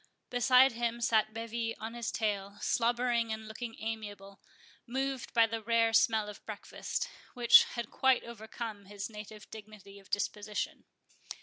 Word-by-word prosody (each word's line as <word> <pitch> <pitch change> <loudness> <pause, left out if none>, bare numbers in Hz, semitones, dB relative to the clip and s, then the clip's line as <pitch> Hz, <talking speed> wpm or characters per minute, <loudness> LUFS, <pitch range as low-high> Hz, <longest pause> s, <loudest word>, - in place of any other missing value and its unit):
Beside 255 +1 +6
him 235 0 -2
sat 220 -2 +2
Bevis 230 0 -3
on 220 +2 -5
his 235 -2 -3
tail, 200 -2 -2
slobbering 235 -1 +1
and 220 0 -5
looking 225 +1 -6
amiable, 205 -3 -6 0.5
moved 265 +1 -2
by 230 -1 +7
the 225 0 -4
rare 230 0 +2
smell 220 -2 +4
of 210 - -7
the - - -27
breakfast, - - -4 0.3
which 240 -1 +8
had 235 -2 -4
quite 265 -1 +3
overcome 220 -2 -7
his 205 +2 -6
native 210 0 -10
dignity 205 -2 -11
of 195 -1 -19
disposition. 210 +1 -3
225 Hz, 145 wpm, -32 LUFS, 210-235 Hz, 0.5 s, which